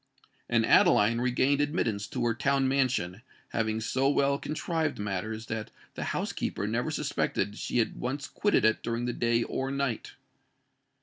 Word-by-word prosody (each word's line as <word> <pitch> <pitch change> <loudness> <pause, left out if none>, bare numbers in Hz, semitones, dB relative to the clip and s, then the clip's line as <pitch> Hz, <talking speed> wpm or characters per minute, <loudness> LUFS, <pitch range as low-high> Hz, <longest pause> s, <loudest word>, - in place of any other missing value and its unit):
And - - +3
Adeline 115 +3 +5
regained 130 +3 +2
admittance 115 -9 -1
to - - -2
her 115 - +2
town 135 +3 +1
mansion, 130 -8 0 0.3
having 110 -1 -1
so 130 +5 +1
well 140 0 +2
contrived 155 0 -2
matters 105 +2 -3
that 110 -1 -4 0.2
the - - -4
housekeeper - - -2
never - - -1
suspected 100 - -1
she - - -2
had 115 - +1
once 135 +3 -3
quitted 205 - +2
it 110 - +3
during 115 +1 -2
the 120 - -1
day 115 0 +1
or 130 +3 -3
night. 140 -4 -2
120 Hz, 150 wpm, -29 LUFS, 110-140 Hz, 0.3 s, Adeline